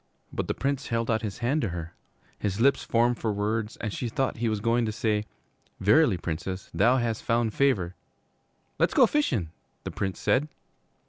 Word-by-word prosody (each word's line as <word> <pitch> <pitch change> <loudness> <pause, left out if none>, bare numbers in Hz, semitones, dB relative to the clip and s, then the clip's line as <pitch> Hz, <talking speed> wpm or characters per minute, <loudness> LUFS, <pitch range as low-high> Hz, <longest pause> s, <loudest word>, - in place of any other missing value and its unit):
But - - -2
the - - -1
Prince 140 -1 -1
held 115 0 0
out 110 -1 +1
his 105 -4 -4
hand 145 +5 +2
to 110 - -1
her. 85 -1 -6 0.5
His 100 0 -2
lips 140 +3 +3
formed 120 +1 +2
for 110 - 0
words 105 +2 -2
and 105 -3 -4
she 120 - -3
thought 130 +3 -1
he 115 0 0
was 110 -1 -1
going 115 +2 +2
to - - -1
say, 105 -1 0 0.5
'Verily, 110 - +4
Princess, 90 +3 -5
thou 115 +10 +4
hast 115 -3 -1
found 115 -1 +1
favor 105 -11 +2 0.4
' - - -43
'Le' - - +4
's - - -9
go - - +7
fishin',' 120 - 0 0.3
the - - -4
Prince 95 -3 -3
said. 140 +4 +2
115 Hz, 195 wpm, -27 LUFS, 100-120 Hz, 0.5 s, go